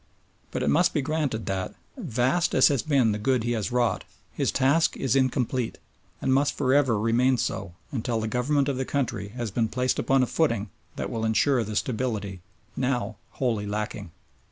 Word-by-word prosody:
But - - -3
it - - +1
must 175 +3 +3
be 145 - +1
granted 145 -7 -1
that, 95 -1 -3 0.2
vast 145 - 0
as - - +6
has 140 -5 +1
been 135 -7 +2
the 105 - -2
good 125 +2 +1
he 120 - -1
has 115 0 -1
wrought, 120 -1 +1 0.3
his - - 0
task 140 +5 +2
is 135 -1 0
incomplete, 130 -2 0 0.5
and 130 - +2
must 140 +2 +2
for 130 -2 +2
ever 135 -6 +3
remain 120 +4 +3
so 85 -5 -3 0.2
until 120 -3 -1
the 110 - -2
Government 135 +5 +1
of 140 -2 -1
the 130 - 0
country 120 -8 -2
has 115 0 -5
been 115 +3 +1
placed 125 +3 0
upon 135 -1 +3
a - - +3
footing 115 -8 0 0.2
that - - -4
will 115 -1 -3
ensure 120 +3 +2
the 110 0 -5
stability 105 -6 -2 0.3
now 120 -5 -1 0.2
wholly 115 -6 -1
lacking. 105 -2 -4
125 Hz, 185 wpm, -26 LUFS, 110-135 Hz, 0.5 s, as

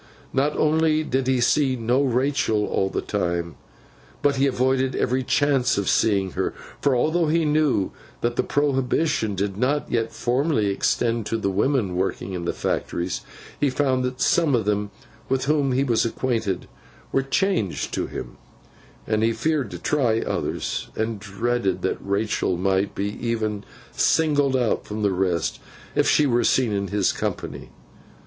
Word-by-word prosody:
Not 140 +3 +1
only 155 0 +2
did 130 -3 -1
he 130 -1 +2
see 135 +2 +3
no 120 +3 +1
Rachael 130 -5 +1
all 95 - 0
the - - -3
time, 85 -4 -2 0.7
but 140 -1 +3
he 140 +1 +3
avoided 130 0 +1
every 130 +2 +1
chance 135 -2 +2
of 100 -2 -1
seeing 100 -4 +2
her; - - -2 0.3
for, 140 -3 +3
although 160 +6 +2
he 165 +1 +2
knew 150 -9 +2 0.3
that 120 0 0
the - - +2
prohibition 135 -5 0
did 100 0 -2
not 140 +6 0
yet 115 -1 0
formally 125 -3 +1
extend 115 +2 0
to 115 - -1
the 100 -3 -1
women 105 -2 +1
working 95 0 -2
in 85 -2 -4
the - - +1
factories, 85 +1 -2 0.4
he 145 - +2
found 130 -1 +1
that 125 0 -3
some 160 -6 +3
of 110 -4 0
them 105 0 0 0.4
with 135 0 0
whom 145 -2 +2
he 130 +2 +2
was 120 -5 +2
acquainted 115 -5 -1 0.4
were 135 - +2
changed 135 - 0
to - - -1
him, - - -7 0.7
and 110 0 0
he 115 +1 +2
feared 150 -3 0
to 90 - -7
try 120 - +1
others, - - -2
and 110 -1 -2
dreaded 110 +1 -1
that 95 - -1
Rachael 100 -2 0
might 95 +2 0
be 100 +1 -2
even 110 -3 -1 0.3
singled 145 -4 +2
out 120 -3 0
from 105 0 -4
the 100 - +3
rest 90 -3 0 0.3
if - - +2
she 150 - +4
were 120 -3 +2
seen 125 -4 +2
in 100 -1 -1
his 100 -1 +1
company. - - -4
120 Hz, 165 wpm, -23 LUFS, 100-140 Hz, 0.7 s, she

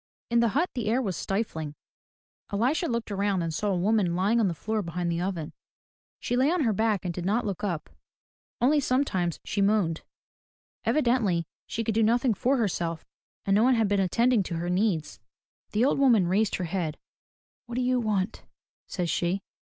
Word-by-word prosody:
In 235 - +4
the 235 - +4
hut 345 +4 +1
the 240 -5 -3
air 230 +4 +2
was 200 -8 -2
stifling. 160 -8 -3 0.8
Elisha 255 - +1
looked 235 -2 -2
around 200 -2 0
and 165 -1 -2
saw 205 +6 -1
a 190 - +1
woman 190 -2 +2
lying 200 +6 +2
on 220 - +3
the 170 - -2
floor 220 +6 -2
behind 170 -1 -2
the 170 +1 -1
oven. 175 -5 -3 0.7
She 245 - -2
lay 260 +3 +3
on 355 0 +1
her 225 -4 +2
back 215 -2 0
and 175 - -2
did 180 - -5
not 215 +6 +1
look 200 0 -4
up. 170 -6 -2 0.7
Only 290 +5 +4
sometimes 250 - 0
she 200 - -1
moaned. 195 -5 +2 0.8
Evidently 235 - +2 0.2
she 230 - -3
could 220 - -1
do 225 - +2
nothing 235 +2 +3
for 260 +7 +1
herself 170 -7 -1 0.4
and 195 - +2
no 205 - +4
one 255 +2 +5
had 225 -2 +2
been 200 0 +1
attending 230 +5 +3
to 175 -2 -4
her 175 +2 -2
needs. 180 -4 0 0.5
The 220 +4 +2
old 275 - +2
woman 235 -10 +5
raised 200 +4 +2
her 185 - -3
head. 165 -3 -2 0.7
"What 235 - -6
do 250 - 0
you 250 0 +2
want?" 215 -2 -1 0.5
says 180 -3 -2
she. 180 +3 0
205 Hz, 190 wpm, -27 LUFS, 180-235 Hz, 0.8 s, one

